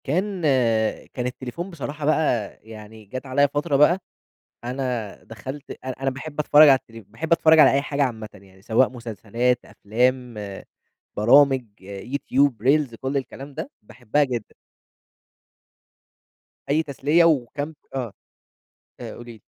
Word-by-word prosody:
كان 185 +6 -1 0.7
كان 125 -1 -2
التليفون 130 +8 -6
بصراحة 150 -3 -6
بقى، 145 -9 0
يعني 110 0 -12
جات 130 +7 -7
عليا 140 +2 +3
فترة 145 +1 -1
بقى، 150 +6 +5 0.7
أنا 125 -4 -3
دخلت 130 +6 -9
أنا 130 - -3
أنا 135 0 0
باحب 145 +3 -6
أتفرج 150 0 +7
على 135 -1 +6
التل 115 -2 -14
باحب 160 - -6
أتفرج 160 -1 +5
على 155 - +8
أي 140 +1 +2
حاجة 145 0 -1
عامةً، 110 -5 -2
يعني 95 -1 -18
سواء 115 +4 +3
مسلسلات، 120 +1 -2
أفلام، 125 +3 -1 0.8
برامج، 130 +4 +5 0.5
YouTube، 140 0 +2
Reels 135 -2 +2
كل 135 +2 -2
الكلام 135 +1 -7
ده 155 +1 -6
باحبها 120 +6 -1
جدًا. 125 -5 -4 2.2
أي 155 +3 +2
تسلية 150 +3 +2
وكم 145 0 0 0.2
آه، 120 -6 -3 0.9
آآ - - -7
قولي 120 0 -10
لي. 110 -3 -17
130 Hz, 130 wpm, -23 LUFS, 115-145 Hz, 2.2 s, على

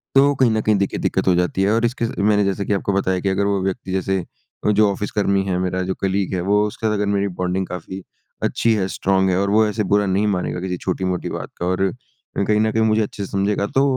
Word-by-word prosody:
तो 140 +1 +6
कहीं 130 -3 +3
न 110 0 +1
कहीं 105 0 +2
देखिए 100 -1 -1
दिक्कत - - -1
हो 95 - +5
जाती 90 +2 0
है। 100 - +2
और 115 +1 +2
इसके 120 0 -1
अ, - - -2
मैंने 105 0 +3
जैसे 100 0 -1
कि 105 - 0
आपको 100 0 -1
बताया 95 -1 +1
कि 100 - -1
अगर 100 +1 +1
वो 100 -1 +1
व्यक्ति 95 0 -3
जैसे 95 0 0 0.5
अ, 105 - +4
जो 105 0 +4
ऑफ़िस 100 +1 -4
कर्मी 100 -2 +1
है 95 -2 -1
मेरा 95 0 -1
जो - - +1
कलीग 95 0 0
है 90 - -1
वो 105 +3 +2
उसके 110 +2 -3
साथ 105 - +1
अगर 105 -1 0
मेरी 100 0 +1
बॉन्डिंग 90 +1 -1
काफ़ी 95 +1 -7 0.4
अच्छी 115 - +2
है 100 -4 0
स्ट्रॉन्ग 95 0 +1
है 90 - +1
और 100 0 0
वो 110 +2 +4
ऐसे 105 0 -1
बुरा 100 +1 +2
नहीं 100 +2 +1
मानेगा 90 -3 -1
किसी 90 -1 -3
छोटी-मोटी 90 0 -2
बात - - -5
का। 85 - -3
और 95 +1 +1 0.6
कहीं 105 0 +3
न 110 0 +2
कहीं 110 0 +1
मुझे 110 0 +3
अच्छे 100 -1 -4
से - - -12
समझेगा 100 +1 0
तो 135 - +5
100 Hz, 260 wpm, -21 LUFS, 95-105 Hz, 0.6 s, तो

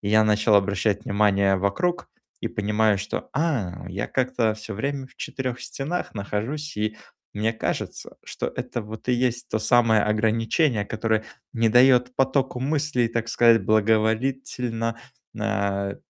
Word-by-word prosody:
И 100 - -3
я 110 +1 +5
начал 105 0 +3
обращать 100 +1 +1
внимание 100 -1 +2
вокруг 170 - -1 0.3
и - - -3
понимаю, 105 0 +1
что: 95 - -5
"А, 130 - -1
я 95 +2 -3
как-то 125 -4 0
всё 110 0 -7
время 135 +4 -3
в - - -23
четырёх 130 -2 -4
стенах 160 +6 -4
нахожусь". 115 +9 -4
И 110 +1 -2 0.4
мне 110 +2 0
кажется, 110 - -4
что - - -4
это, 125 -1 -5
вот 110 +3 -10
и 125 - +4
есть 125 0 0
то 110 - -1
самое 115 -2 +4
ограничение, 110 +3 +1
которое 110 0 -1 0.3
не 115 -1 +2
даёт 125 +1 +5
потоку 135 -1 +1
мыслей, 140 -3 +1
так 115 0 -3
сказать, 115 -3 +5
благоволительно, 115 +2 0 0.4
нэ - - -4 0.5
э, - - -10
115 Hz, 145 wpm, -24 LUFS, 105-130 Hz, 0.5 s, я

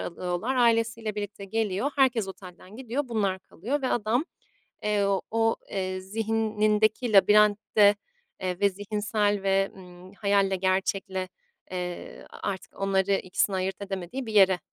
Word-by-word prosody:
alıyorlar. 180 +9 -3
Ailesiyle 230 -2 +2
birlikte 205 -1 -5
geliyor. 215 +5 -1
Herkes 245 -7 +3
otelden 185 +2 -11
gidiyor, 260 +2 -3
bunlar 200 -5 0
kalıyor 255 - -4
ve 260 - 0
adam, 240 +6 +1 0.6
eee, 210 -1 +1 0.3
o, 225 0 +2
eee, 185 -1 -2
zihnindeki 215 +2 +1
labirentte, 210 0 +5 0.5
eee, 180 -1 -3
ve 200 - +5
zihinsel 205 0 -1
ve, 195 0 +2
ımm, 180 0 -13
hayalle, 200 -2 +2
gerçekle, 190 0 -1 0.4
eee, 180 -1 -6 0.2
artık 195 -1 -5
onları 195 0 +1
ikisini 190 +1 0
ayırt 190 +2 -2
edemediği 195 +6 -5
bir 220 - -5
yere, 190 -3 +6
205 Hz, 125 wpm, -27 LUFS, 190-220 Hz, 0.6 s, yere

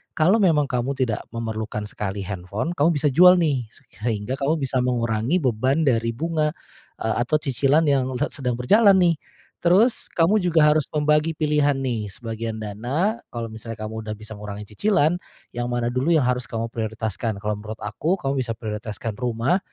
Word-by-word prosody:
Kalau 180 +8 +4
memang 160 -6 +4
kamu 125 +2 -1
tidak 120 -5 0
memerlukan 110 -2 -4
sekali 100 -1 -4
handphone, 100 - -4
kamu 145 +3 +4
bisa 145 0 -2
jual 180 +6 +7
nih, 140 -7 +1
se - - -19 0.2
sehingga 110 +1 -2
kamu 140 +3 +1
bisa 130 -1 0
mengurangi 120 +4 0
beban 130 +3 +1
dari 115 -3 +2
bunga, 155 +1 0 0.5
eee, 110 -1 0
atau 155 +4 +2
cicilan 140 +3 +2
yang 135 -2 +2
led - - 0
sedang 125 -3 -2
berjalan 200 - +5
nih. 175 -2 +4 0.5
Terus 200 +8 +3
kamu 175 +6 +3
juga 170 -3 +3
harus 155 -3 +1
membagi 150 +1 +2
pilihan 150 -2 +2
nih, 120 -6 -2
sebagian 115 +1 -5
dana, 130 - -1
kalau 115 -1 -3
misalnya 110 0 -8
kamu 110 0 -5
udah 105 - -2
bisa 110 +1 -9
ngurangi 105 0 -7
cicilan, 175 - +2 0.4
yang 120 0 -2
mana 120 -1 0
dulu 130 +6 0
yang 150 - +4
harus 125 0 0
kamu 115 0 -3
prioritaskan. 110 -1 -3
Kalau 105 0 -1
menurut 110 +1 -7
aku, 150 - -1
kamu 135 0 -1
bisa 115 -2 -3
prioritaskan 110 0 -5
rumah 125 - 0
125 Hz, 175 wpm, -23 LUFS, 110-155 Hz, 0.5 s, jual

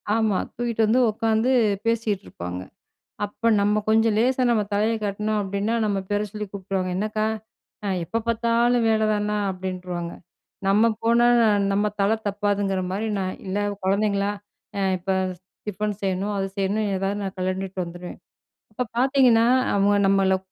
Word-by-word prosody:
ஆமா. 220 -4 +2 0.2
தூக்கிட்டு 235 -1 -1
வந்து 245 +4 +3
உட்காந்து 225 +3 +1 0.4
பேசிட்டு 220 -3 0
இருப்பாங்க. 90 +1 -6 0.6
அப்ப 205 +3 -3
நம்ம 210 +1 +2
கொஞ்சம் 225 0 +3
லேசா 255 +3 +2
நம்ம 215 -3 +2
தலையை 215 +3 +2
காட்னோம் 210 +1 -1
அப்டின்னா, 200 +3 -1
நம்ம 200 -2 0
பேர 205 +1 0
சொல்லி 210 -1 -4
கூப்புடுருவாங்க. 190 -2 -3
"என்னக்கா 215 +2 -1 0.6
அ - - 0 0.2
எப்போ 230 - -2
பார்த்தாலும் 235 +1 +2
வேலதான்னா?" 215 -1 +1 0.2
அப்டின்ருவாங்க 180 -2 -5 0.5
நம்ம 210 +4 +4 0.2
போனா 235 +1 +4 0.5
நம்ம 205 +1 +2
தலை 200 +3 +3
தப்பாதுங்குற 200 -1 0
மாரி 210 +4 -2
நான் 185 -1 -2
இல்ல 195 +2 -1 0.2
குழந்தைங்களா 200 +1 +1 0.5
அ - - 0 0.2
இப்ப 185 +2 -3 0.6
டிஃபன் 210 +1 -2
செய்யணும், 195 +2 -1
அது 195 - -1
செய்யணும் 205 +2 0
எதாவது 195 +2 -1
நான் 190 0 -5
கலன்டுட்டு 185 +1 -3
வந்துருவேன். 175 +1 -8 0.6
இப்ப 250 - -1
பார்த்தீங்கன்னா, 250 -3 +4 0.3
அவங்க 200 +1 +3
நம்மள 195 -1 +3
205 Hz, 135 wpm, -24 LUFS, 195-220 Hz, 0.6 s, நம்ம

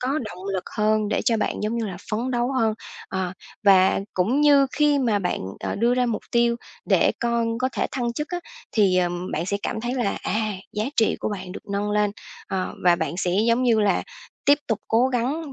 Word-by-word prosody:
có 250 - -2 0.2
động 185 -2 -8
lực 185 - -2
hơn 215 -1 +2
để - - 0
cho 230 - +3
bạn, 210 - -2
giống 215 +2 -1
như 225 - -1
là, 185 -3 -5
phấn 235 +4 -1
đấu 245 +2 0
hơn. 225 -4 +2 0.3
Ờ, 190 -2 -2 0.3
và 190 -1 +5
cũng 230 +11 +2
như 285 -2 +6
khi 295 -1 +3
mà 225 -6 +2
bạn, 180 -2 -2 0.2
ờ, - - -2
đưa 235 +3 +2
ra 250 0 +2
mục 225 -3 -2
tiêu 235 0 +3 0.3
để - - +3
con 235 -1 0
có 260 +1 +1
thể - - 0
thăng 240 -3 -1
chức 300 +5 -4
á, 355 - -3 0.3
thì, 195 -4 +3
ờm, 175 0 -1
bạn 165 +3 -2
sẽ 200 - 0
cảm 220 - -2
thấy 245 +2 -2
là, 240 -6 -1
à, 215 0 0 0.2
giá 210 +1 -1
trị 220 - +3
của - - -1
bạn 185 -2 -6
được - - -10
nâng 205 +1 -1
lên, 210 -1 +2 0.4
ờ, 190 -1 -2
và 175 -1 +6
bạn 170 - -2
sẽ, 180 -1 0 0.2
giống 235 +2 +3
như 230 -3 +3
là, 205 -1 +2 0.4
tiếp 285 +1 +6
tục 220 - +1
cố 240 +4 +3
gắng 270 +5 -2
225 Hz, 225 wpm, -24 LUFS, 200-245 Hz, 0.4 s, như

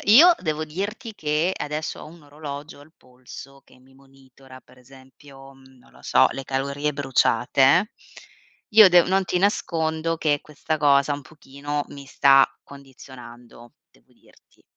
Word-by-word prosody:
io 345 +6 +8
devo 155 -2 -3
dirti 205 +9 -6
che 155 0 -1
adesso 150 +1 -5
ho - - -11
un 165 0 -16
orologio 145 0 -10
al 150 +3 -19
polso 130 +2 -14
che - - -23
mi 130 +1 -24
monitora, 135 -1 -19
pre 125 0 -22
esempio, 135 +1 -17
mhmm, 130 -1 -21
non 125 - -24
lo - - -20
so, - - +3
le 135 - -7
calorie 140 +3 -3
bruciate, 140 - +1 0.8
Io 215 -2 +8
dev 175 -1 +4
non 190 +1 +1
ti 180 0 -2
nascondo 165 -4 -1
che 150 -3 0
questa 155 +1 -5
cosa 145 -1 +2
un 145 - -7
pochino 145 0 -7
mi 140 -1 -11
sta 135 0 +4 0.2
condizionando, 125 -4 -15 0.2
devo - - -30
dirti. - - -28
145 Hz, 150 wpm, -22 LUFS, 135-160 Hz, 0.8 s, io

